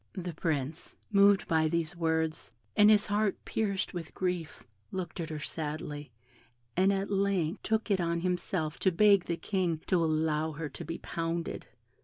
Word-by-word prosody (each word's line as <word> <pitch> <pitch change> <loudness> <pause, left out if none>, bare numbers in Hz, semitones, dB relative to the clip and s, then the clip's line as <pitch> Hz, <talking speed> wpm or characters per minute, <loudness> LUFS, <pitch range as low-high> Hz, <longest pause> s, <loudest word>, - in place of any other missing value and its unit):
The 180 -3 -5
Prince, 155 -1 -2 0.2
moved 200 -1 +5
by 160 -2 +3
these 170 +1 -1
words, 160 -5 -1 0.2
and 210 0 +7
his 210 0 +6
heart 205 -1 +1
pierced 200 -3 -1
with 170 -3 -6
grief, 180 -4 -2 0.3
looked 185 -1 -4
at 165 -1 -3
her 155 - -4
sadly, 150 -1 -5 0.7
and 190 +2 +4
at 195 +1 -1
length 195 -3 +1
took 220 0 0
it 190 -2 +3
on 170 0 0
himself 175 -3 -1
to 190 - +3
beg 200 +1 +5
the 170 - -2
King 175 -2 -1
to 175 -3 +2
allow 155 0 +1
her 150 0 -4
to - - -8
be 165 +2 -4
pounded. 165 0 -3
170 Hz, 165 wpm, -30 LUFS, 160-195 Hz, 0.7 s, and